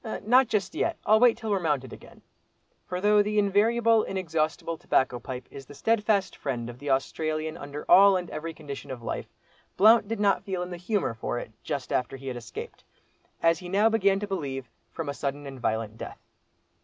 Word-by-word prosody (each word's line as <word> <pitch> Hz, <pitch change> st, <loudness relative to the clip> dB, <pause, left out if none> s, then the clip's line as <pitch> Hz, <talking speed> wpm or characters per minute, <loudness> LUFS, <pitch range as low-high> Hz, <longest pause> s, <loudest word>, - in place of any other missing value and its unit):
"Not 250 Hz, +3 st, +5 dB
just 195 Hz, -4 st, -1 dB
yet, -, -, -1 dB
I'll 215 Hz, +1 st, +5 dB
wait 240 Hz, -1 st, +5 dB
till 225 Hz, -2 st, -4 dB
we're 200 Hz, -, +2 dB
mounted 145 Hz, -7 st, -1 dB
again." -, -, -14 dB, 0.6 s
For 180 Hz, -, -3 dB
though 210 Hz, +2 st, +4 dB
the 210 Hz, +1 st, -1 dB
invariable, 220 Hz, +3 st, +3 dB
inexhaustible 165 Hz, -3 st, -2 dB
tobacco 130 Hz, -5 st, +1 dB
pipe 125 Hz, 0 st, -7 dB
is 135 Hz, -1 st, -10 dB
the 145 Hz, -, -12 dB
steadfast 210 Hz, +1 st, +1 dB
friend 120 Hz, -4 st, -4 dB
of 120 Hz, -, -15 dB
the 145 Hz, -, -5 dB
Australian 155 Hz, +3 st, -1 dB
under 145 Hz, -2 st, -7 dB
all 195 Hz, 0 st, +7 dB
and 180 Hz, -1 st, -4 dB
every 160 Hz, +2 st, -4 dB
condition 145 Hz, -4 st, -8 dB
of 125 Hz, -3 st, -7 dB
life, -, -, -4 dB, 0.5 s
Blount 220 Hz, +1 st, +6 dB
did 225 Hz, 0 st, -3 dB
not 200 Hz, -1 st, +3 dB
feel 185 Hz, -2 st, -3 dB
in 180 Hz, -, -7 dB
the 175 Hz, -, -5 dB
humour 185 Hz, -, -1 dB
for 115 Hz, +1 st, -3 dB
it 110 Hz, -, -6 dB
just 135 Hz, -3 st, -4 dB
after 125 Hz, +2 st, -1 dB
he 135 Hz, 0 st, -6 dB
had 125 Hz, -, -4 dB
escaped, 120 Hz, -2 st, -8 dB, 0.6 s
as 165 Hz, 0 st, +4 dB
he 180 Hz, -, -8 dB
now 205 Hz, +4 st, +4 dB
began 200 Hz, -3 st, +2 dB
to 205 Hz, -, -3 dB
believe, 140 Hz, -, -4 dB, 0.2 s
from 165 Hz, -3 st, -5 dB
a 140 Hz, -, -2 dB
sudden 140 Hz, +1 st, -4 dB
and 135 Hz, -2 st, -8 dB
violent 110 Hz, -1 st, -2 dB
death. -, -, -7 dB
165 Hz, 200 wpm, -27 LUFS, 135-205 Hz, 0.6 s, all